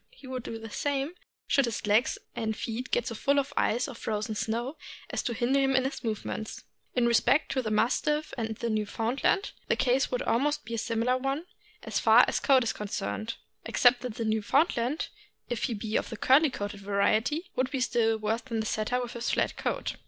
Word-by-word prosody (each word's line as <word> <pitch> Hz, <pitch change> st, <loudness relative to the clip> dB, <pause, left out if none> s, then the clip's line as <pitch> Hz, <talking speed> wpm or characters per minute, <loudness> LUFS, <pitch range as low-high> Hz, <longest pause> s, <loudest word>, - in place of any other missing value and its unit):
He -, -, -17 dB
would 260 Hz, -1 st, -4 dB
do 225 Hz, -, -6 dB
the 225 Hz, -1 st, -9 dB
same 285 Hz, +5 st, -1 dB, 0.3 s
should 275 Hz, -3 st, +3 dB
his 230 Hz, -1 st, -3 dB
legs 210 Hz, +4 st, +3 dB, 0.2 s
and 220 Hz, -1 st, -2 dB
feet 240 Hz, +3 st, -4 dB
get 240 Hz, -, +1 dB
so -, -, -3 dB
full 280 Hz, +6 st, +1 dB
of 280 Hz, 0 st, 0 dB
ice 240 Hz, +5 st, +1 dB
or 275 Hz, -, -6 dB
frozen 215 Hz, -1 st, -3 dB
snow 235 Hz, +7 st, -2 dB, 0.3 s
as -, -, -1 dB
to 240 Hz, -, -2 dB
hinder 250 Hz, +4 st, +2 dB
him 270 Hz, -1 st, +2 dB
in 260 Hz, -, +4 dB
his 270 Hz, +1 st, -4 dB
movements. 220 Hz, -1 st, -4 dB, 0.3 s
In 245 Hz, -2 st, +3 dB
respect 235 Hz, +5 st, +3 dB
to 260 Hz, -, +1 dB
the 220 Hz, -, -3 dB
Mastiff 295 Hz, +8 st, +1 dB
and 225 Hz, -3 st, -3 dB
Newfoundland, 230 Hz, -, 0 dB, 0.2 s
the -, -, +2 dB
case 260 Hz, +1 st, +2 dB
would 250 Hz, -, -1 dB
almost 290 Hz, +5 st, +1 dB
be 230 Hz, -, -6 dB
a 230 Hz, -, -1 dB
similar 230 Hz, +3 st, +1 dB
one, 270 Hz, +5 st, -2 dB, 0.4 s
as -, -, -1 dB
far -, -, +7 dB
as -, -, 0 dB
coat 265 Hz, -3 st, +4 dB
is 230 Hz, -, -1 dB
con 210 Hz, -, -5 dB
cerned, 200 Hz, -, -3 dB, 0.3 s
except 245 Hz, 0 st, +4 dB
that 250 Hz, -4 st, -5 dB
the 230 Hz, -2 st, -3 dB
Newfoundland, 240 Hz, +5 st, +1 dB, 0.4 s
if 240 Hz, -, -1 dB
he 240 Hz, -, -2 dB
be 215 Hz, +1 st, -4 dB
of -, -, -2 dB
the 225 Hz, -, -6 dB
curly 285 Hz, +7 st, +5 dB
coated 205 Hz, -4 st, -5 dB
variety, 215 Hz, -, +1 dB
would 255 Hz, 0 st, +1 dB
be 275 Hz, -, -2 dB
still 230 Hz, -3 st, +2 dB
worse 220 Hz, +2 st, -1 dB
off -, -, -30 dB
than 230 Hz, -3 st, -2 dB
the 220 Hz, -, -1 dB
Setter 220 Hz, +3 st, 0 dB
with 240 Hz, -, -6 dB
his 235 Hz, 0 st, -2 dB
flat -, -, +1 dB
coat. -, -, -2 dB
240 Hz, 210 wpm, -29 LUFS, 220-270 Hz, 0.4 s, far